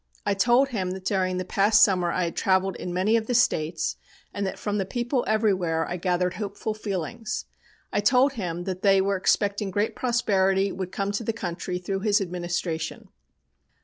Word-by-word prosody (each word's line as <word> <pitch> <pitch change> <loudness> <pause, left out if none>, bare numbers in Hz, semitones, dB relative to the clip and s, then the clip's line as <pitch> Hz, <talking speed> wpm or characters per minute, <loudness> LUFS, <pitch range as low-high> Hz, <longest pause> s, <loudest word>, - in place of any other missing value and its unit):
I - - +2
told 240 +7 +3
him 195 -7 -2
that 190 0 -9
during 185 -2 0
the 185 - -3
past 200 +3 +4
summer 180 -3 +3
I 180 - 0
had 170 - -3
travelled 190 -1 +1
in 180 - -5
many 190 +5 +2
of 220 -1 -3
the 245 - 0
states, 165 -8 +1 0.4
and 200 -1 -2
that - - -5
from 205 -1 -2
the - - +1
people 240 +3 -1
everywhere 185 -7 +1
I 180 - -3
gathered 180 0 0
hopeful 210 +1 -4
feelings. 215 +1 -4 0.5
I - - +2
told 250 +6 +4
him 175 -7 -4
that 185 0 -4
they 195 -1 +5
were 195 +1 +1
expecting 200 +1 +1
great 205 +3 -1
prosperity 195 -5 +1
would 185 -1 -5
come 200 0 -2
to 205 +3 -2
the 225 - -1
country 180 -3 -4
through 195 +2 -3
his 205 +1 +2
administration." 175 -3 -3
195 Hz, 185 wpm, -25 LUFS, 180-215 Hz, 0.5 s, they